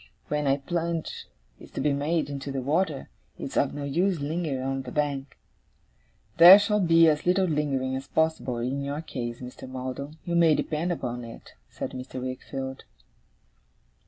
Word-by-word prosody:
When 150 -1 0
a 135 +1 +3
plunge 165 +2 -3 0.3
is - - -13
to - - -4
be 150 - +2
made 150 +2 0
into 140 -1 -5
the 135 -1 -3
water, 155 0 0 0.3
it's - - -6
of - - +1
no 145 - -4
use 170 +5 +1
lingering 145 -2 -2
on 135 0 -2
the 125 -2 -8
bank.' 140 -2 -2 1.0
'There 175 +4 +11
shall 210 0 +1
be 165 -3 +5
as 150 +1 +1
little 185 +1 +4
lingering 140 -5 -1
as 135 - -5
possible, 160 -6 0
in 130 +4 -2
your 140 +2 -3
case, 120 -5 -5
Mr. 125 +1 -9
Maldon, 130 +4 -6
you 175 - -3
may 165 -2 +5
depend 160 +4 -1
upon 125 -7 -3
it,' 115 0 -11 0.2
said - - -5
Mr. 130 0 -7
Wickfield. 130 +1 -5
145 Hz, 165 wpm, -27 LUFS, 130-165 Hz, 1.0 s, There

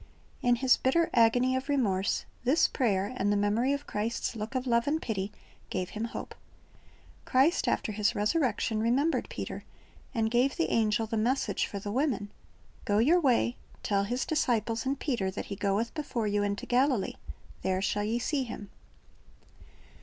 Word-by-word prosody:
"^ - - -17 0.4
In 245 -1 +4
his 255 +1 +4
bitter 325 +6 +2
agony 245 +2 +4
of 260 +2 -3
remorse, 205 -9 +1 0.2
this 270 +7 +4
prayer, 205 -4 0
and 205 +1 +1
the 205 - +2
memory 210 +6 +2
of 285 +1 -2
Christ's 225 +3 -2
look 220 +4 -5
of 255 0 -1
love 235 0 +2
and 310 +2 +1
pity, 205 -7 -3 0.4
gave 185 -1 -3
him 220 +1 -3
hope. 230 - -6 0.9
Christ 270 +7 +3
after - - 0
His 210 0 0
resurrection 220 -1 +1
remembered 265 +8 +1
Peter, - - -6 0.5
and 220 -1 +1
gave 250 +3 +2
the 335 - 0
angel 220 0 +2
the 220 +1 -3
message 245 +5 0
for 200 - -6
the 205 +1 -5
women, 235 -5 -1 0.5
"Go 205 - +1
your 300 +11 +5
way, 250 -5 +2 0.3
tell 200 -1 +1
His 245 +5 -1
disciples 235 -5 0
and 275 +1 -1
Peter 235 -10 -1
that 190 - -5
He - - -4
goeth 200 +4 -1
before 280 -7 -3
you 205 0 +1
into 200 0 -2
Galilee; 250 -3 +1 0.4
there 185 0 0
shall 205 +2 0
ye 220 +3 0
see 275 +4 -1
Him." 215 -4 -8
230 Hz, 170 wpm, -29 LUFS, 205-260 Hz, 0.9 s, your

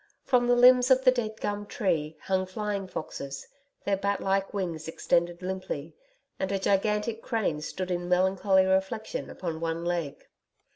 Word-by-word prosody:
From 245 -2 +3
the 245 - +5
limbs 250 +1 +7
of 260 0 +5
the 255 - +7
dead 220 -3 -3
gum 205 0 -3
tree 160 -9 -1
hung 185 -1 0
flying 200 0 -3
foxes, 140 -5 -6 0.4
their 200 - +2
bat 200 +1 0
like 195 0 0
wings 170 -6 -3
extended 170 +2 0
limply, 185 -5 -4 0.4
and 190 - -1
a 195 - +1
gigantic 210 +3 0
crane 215 -12 -1
stood 185 +4 -4
in 175 0 -2
melancholy 190 +1 +3
reflection 190 +4 -1
upon 165 -3 -5
one 165 +1 -2
leg. 170 -5 -3
190 Hz, 155 wpm, -28 LUFS, 175-210 Hz, 0.4 s, limbs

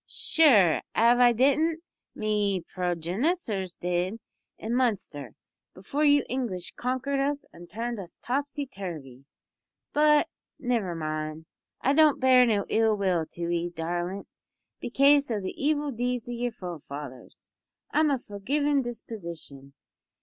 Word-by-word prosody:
"Sure, 215 - +4 0.2
av 235 +2 +5
I 245 -1 +7
didn't, 300 +7 +2 0.3
me 205 -4 0
progenissors 185 - -1
did, 180 +4 -1 0.4
in 225 +2 -4
Munster, 195 - -1 0.4
before 275 +11 -2
you 290 -2 +5
English 230 -9 -3
konkered 260 +3 -2
us 285 +1 -1
an' 175 +1 -12
turned 230 +4 -4
us 180 -3 -10
topsy 280 +3 -2
turvy. 155 - -8 0.7
But 300 0 +4 0.3
nivver 230 -9 -1
mind. 155 0 -4 0.4
I 275 - +2
don't 310 -1 +5
bear 255 -1 +6
no 205 -3 +1
ill 220 -1 +2
will 180 -5 0
to 170 0 -5
'ee, 175 0 -1
darlint, 175 +3 -4 0.5
bekaise 280 +3 +3
o' 220 -3 -1
the 190 -1 -5
evil 295 0 0
deeds 245 0 -2
o' - - -5
yer 240 +1 -2
forefathers. 150 - -9 0.4
I'm 310 0 +3
of 270 -4 0
a 205 -4 -9
forgivin' 285 +5 +1
disposition. 170 - -8
220 Hz, 130 wpm, -27 LUFS, 175-270 Hz, 0.7 s, I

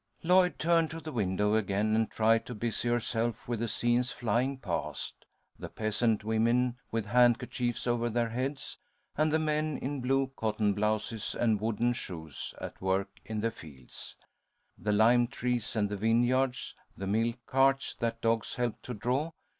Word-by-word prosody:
Lloyd 180 +1 +4
turned 165 0 +3
to 165 - -6
the 160 -1 -7
window 105 -3 +1
again 110 0 +1
and 110 0 +2
tried 115 +1 +2
to 125 - -5
busy 115 +2 -2
herself 120 -1 -1
with 120 -2 -2
the 115 - -1
scenes 120 +4 +1
flying 125 +1 0
past: 85 - -4 0.3
the - - -6
peasant 110 0 0
women 115 +3 +2
with 115 -2 -2
handkerchiefs 120 +1 +2
over 120 -1 +1
their 120 0 0
heads, 130 +4 -4 0.4
and 155 +1 +2
the 160 - +4
men 155 -1 0
in 140 0 -3
blue 135 +1 +1
cotton 110 -2 +1
blouses 105 +1 -1
and 110 -3 +1
wooden 115 +2 +1
shoes 80 - -6
at - - -7
work 95 +1 +1 0.2
in 110 -1 -3
the 115 +1 0
fields; 70 - -11 0.6
the 105 - -2
lime 120 +3 +5
trees 120 -1 -2
and 105 -2 +2
the 105 0 -4
vineyards, 120 +4 +1 0.2
the 95 - -4
milk 115 +4 +1
carts 135 +1 +2
that 115 -1 -3
dogs 115 -1 0
helped 120 -2 -2
to 125 - -6
draw. 125 +9 0
115 Hz, 160 wpm, -30 LUFS, 110-125 Hz, 0.6 s, lime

